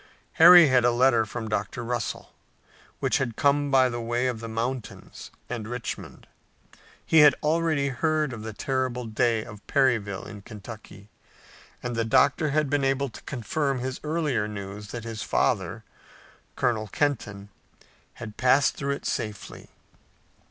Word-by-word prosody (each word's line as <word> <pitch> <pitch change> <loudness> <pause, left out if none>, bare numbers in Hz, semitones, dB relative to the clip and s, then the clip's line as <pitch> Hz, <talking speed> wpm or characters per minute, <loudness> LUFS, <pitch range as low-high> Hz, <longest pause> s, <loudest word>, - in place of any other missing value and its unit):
Harry 175 -1 +10
had 130 -2 +3
a 120 - +5
letter 120 -2 +3
from 115 +1 -5
Dr. 105 +3 -3
Russell, 120 -1 -4 0.7
which - - +1
had 120 -4 -2
come 145 0 +2
by 130 -2 +4
the 120 -1 -4
way 120 +2 -1
of 125 -3 -1
the 115 - -7
mountains 120 +2 -5 0.2
and 115 -3 -5
Richmond. 120 0 -6 0.8
He 160 - +4
had 150 -2 +7
already 155 -2 +1
heard 155 +2 0
of 110 - -7
the 110 0 -6
terrible 130 +2 -2
day 115 0 0
of 105 -3 -11
Perryville 115 -8 +1
in 105 -1 -10
Kentucky, 105 -1 -11 0.7
and 125 -1 -3
the 115 - 0
doctor 135 +6 +3
had 150 +1 +1
been 145 0 0
able 135 0 0
to - - -12
confirm 135 +2 -2
his 130 +1 -4
earlier 150 -8 -1
news 100 0 -7
that 115 +2 -7
his 115 -2 -6
father, - - 0 0.7
Colonel 110 -3 0
Kenton, 105 -6 -2 0.7
had 110 -2 -9
passed 130 +2 +3
through 140 0 -2
it - - -12
safely. 105 -2 -5
125 Hz, 150 wpm, -26 LUFS, 110-140 Hz, 0.8 s, Harry